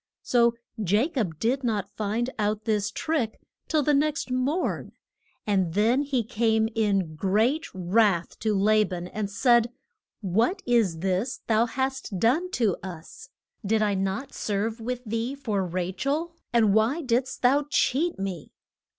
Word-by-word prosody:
So 235 -1 +3 0.2
Ja 210 - +2
cob 210 - -2
did 255 - 0
not 205 -4 -2
find 220 +4 -1
out 210 0 -1
this 210 -2 +1
trick 250 -1 -2 0.3
till 310 -2 +2
the 295 - +2
next 290 -2 0
morn, 270 +8 -1 0.5
and 190 -5 0
then 230 +6 +3
he 275 -4 0
came 220 -1 +1
in 200 -7 +1
great 220 - +1
wrath 185 -1 +1
to 215 -1 0
La 215 +2 +4
ban 180 -3 -5
and 210 0 -3
said, 235 +2 +3 0.5
What 225 - +1
is 220 -10 +2
this 195 +7 -1
thou 225 +1 +3
hast 265 -4 -3
done 270 - +2
to 225 - +1
us? 190 - -9 0.3
Did 215 +1 +2
I 205 -1 +1
not 195 +8 -2
serve 215 +3 -2
with 250 +2 -3
thee 230 +4 -2
for 215 -9 -1
Ra 180 0 -2
chel? 305 - -2 0.2
and 220 -4 +4
why 225 +10 +2
did'st 255 0 -1
thou 280 +4 +3
cheat 295 +3 +1
me? 190 -5 -5
225 Hz, 150 wpm, -26 LUFS, 200-255 Hz, 0.5 s, La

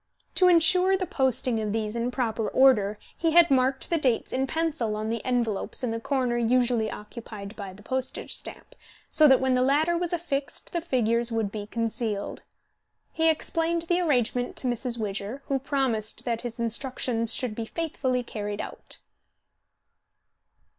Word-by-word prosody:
To 365 - +5
insure 360 +2 +5
the 370 - -2
posting 255 -5 0
of 210 -1 -2
these 215 0 -2
in 235 +1 -1
proper 230 -4 -1
order, 215 -6 +4 0.2
he 330 -2 0
had 340 -2 +6
marked 265 0 +2
the 335 - +2
dates 255 -6 0
in 265 +1 0
pencil 305 -10 -1
on 215 +1 -2
the 230 -1 -3
envelopes 240 -3 -1
in 245 - 0
the 230 - -2
corner 255 -2 0
usually 235 -1 +2
occupied 210 -1 -8
by 200 -3 -7
the 205 +2 -15
postage 260 +2 -3
stamp, - - -4 0.4
so 310 -1 +7
that 265 -2 +6
when 260 -1 +1
the 250 - +3
latter 295 +6 +3
was 345 0 -1
affixed 290 -5 -3
the 340 - -1
figures 235 -6 +1
would 225 -3 -1
be 205 -1 -6
concealed. 225 -2 -2 0.7
He 325 0 +3
explained 330 +1 0
the 350 +1 +1
arrangement 250 -6 +1
to 255 - 0
Mrs. 240 0 -1
Widger, 215 +4 -4
who 275 -1 0
promised 260 -6 -2
that 235 -2 -1
his 240 -1 -6
instructions 235 0 -1
should 250 -5 -2
be 225 +1 -4
faithfully 265 -4 -2
carried 210 -3 -5
out. - - -6
250 Hz, 165 wpm, -26 LUFS, 225-280 Hz, 0.7 s, so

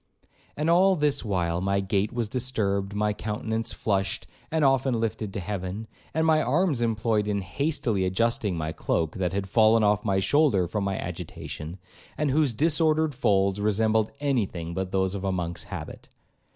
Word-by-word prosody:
And 150 +2 -1
all 185 +3 +5
this 145 -3 +1
while 90 -5 -1
my 100 +1 +1
gait 100 +1 0
was 120 -2 -2
disturbed, 105 -5 -1
my 105 0 +1
countenance 110 +2 -3
flushed, 100 -2 -1 0.2
and 160 -2 +1
often 135 -3 +2
lifted 110 -2 -2
to - - -3
heaven, 100 +2 -4 0.3
and 160 +1 0
my 155 -1 +4
arms 150 0 +1
employed 110 -2 +1
in 100 -1 0
hastily 115 - -1
adjusting 100 0 0
my 80 0 -2
cloak, 80 +1 -1
that 90 -2 0
had 95 0 -2
fallen 110 +2 +4
off 105 0 +2
my 100 -3 +1
shoulder 100 - +3
from 100 +3 -2
my 100 -1 -1
agitation, 80 +4 -6 0.4
and 150 -2 +1
whose 145 -4 +2
disordered 155 +1 +3
folds 100 -5 +1
resembled 110 +1 +2
any 135 -8 +1
thing 85 -2 -6
but 95 +1 -3
those 95 -1 +1
of 100 -1 -4
a 95 - 0
Monk's 85 -2 -3
habit. - - -8
105 Hz, 170 wpm, -26 LUFS, 95-130 Hz, 0.4 s, all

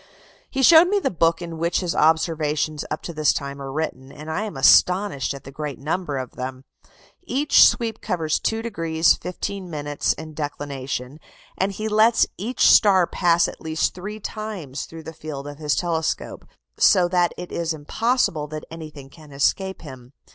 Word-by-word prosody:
He 270 -1 -1
showed 330 +5 +8
me 405 +2 +1
the 400 - 0
book 165 -1 +1
in 165 -1 -7
which 170 +2 0
his 175 -2 -2
observations 155 -1 +1
up 155 - -4
to 170 - -6
this 155 -1 +2
time 140 0 -5
are 135 -1 -6
written, 135 -3 -4
and 155 +2 -8
I 205 +7 -2
am 210 - -7
astonished 180 - +4
at 140 - -11
the 135 - -10
great 150 -1 -5
number 150 0 -3
of 130 -2 -5
them. 130 0 -6 0.6
Each 290 -4 +4
sweep 225 -3 -2
covers 160 -3 -1
2° 170 -8 +1
15' 185 0 -5 0.5
in 160 -1 -9
declination, 140 -2 -5 0.4
and 190 +2 0
he 215 +3 -4
lets 220 +2 +4
each 230 +6 0
star 190 -4 +6
pass 170 -1 +2
at - - -9
least 160 0 -1
three 205 +4 -7
times 205 -11 -6
through 165 0 -11
the 160 - -8
field 150 -3 -7
of 145 0 -9
his 150 -2 0
telescope, 165 -2 -2 0.3
so 180 -3 +5
that 175 -1 +2
it 180 - -8
is 170 -1 -2
impossible 160 - 0
that 155 0 -7
anything 155 -4 -9
can 150 +1 -16
escape 190 +8 -1
him. 130 -3 -11
160 Hz, 170 wpm, -23 LUFS, 145-190 Hz, 0.6 s, showed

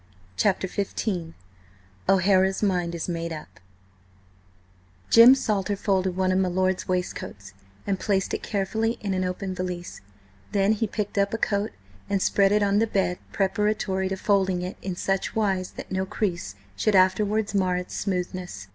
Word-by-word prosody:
CHAPTER 190 - +1
XV 185 -3 -3 0.7
O'HARA'S 190 +1 +3
MIND 180 -4 0
IS 165 - -4
MADE 170 -1 -3
UP 155 - -10 1.5
JIM 235 +3 +9
SALTER 205 -5 -1
folded 190 -2 0
one 185 0 +2
of 185 - +2
my 190 - +2
lord's 185 +1 0
waistcoats, 100 - -4 0.3
and 195 -2 -1
placed 195 -3 0
it - - -2
carefully 220 +3 -1
in 200 -2 -2
an 185 0 0
open 185 +1 -3
valise; 180 -1 -5 0.5
then 200 +1 +3
he 220 +1 0
picked 205 0 -3
up 200 +2 +1
a - - -1
coat, 205 -1 0 0.4
and 200 - +1
spread 195 +1 +3
it 210 0 +3
on 200 0 +3
the 225 - +2
bed 190 -4 0
preparatory 195 -1 0
to 190 - -2
folding 190 -2 +1
it 180 - -5
in 185 -2 -4
such 195 +1 -1
wise 195 -4 0
that - - -9
no 190 0 -1
crease 180 - -2 0.2
should 210 - +1
afterwards 205 +3 +3
mar 185 -2 +1
its 180 0 -6
smoothness. 180 - -4
190 Hz, 160 wpm, -25 LUFS, 185-205 Hz, 1.5 s, JIM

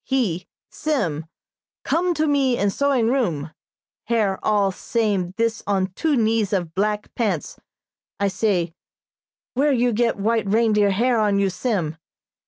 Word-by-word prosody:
He 205 -10 -1 0.2
Sim 165 - -2 0.6
come 350 +1 +1
to 310 +1 +1
me 275 -4 +2
in 200 0 +1
sewing 265 -2 +1
room, 165 - -1 0.5
hair 215 -5 +1
all 205 -2 +2
same 195 -3 -1
this 230 -1 0
on 190 -2 0
two 310 +8 +1
knees 220 -3 +1
of 175 -4 -1
blank 210 +2 -1
pants. 200 -10 -2 0.6
I 200 - +2
say, 190 -4 0 0.8
'Where 285 +4 +2
you 245 -2 +2
get 230 +1 +1
white 220 +1 0
reindeer 210 -1 +3
hair 235 +4 +2
on 205 -2 +2
you, 200 -1 +2
Sim?' 180 -7 -2
215 Hz, 140 wpm, -22 LUFS, 190-240 Hz, 0.8 s, reindeer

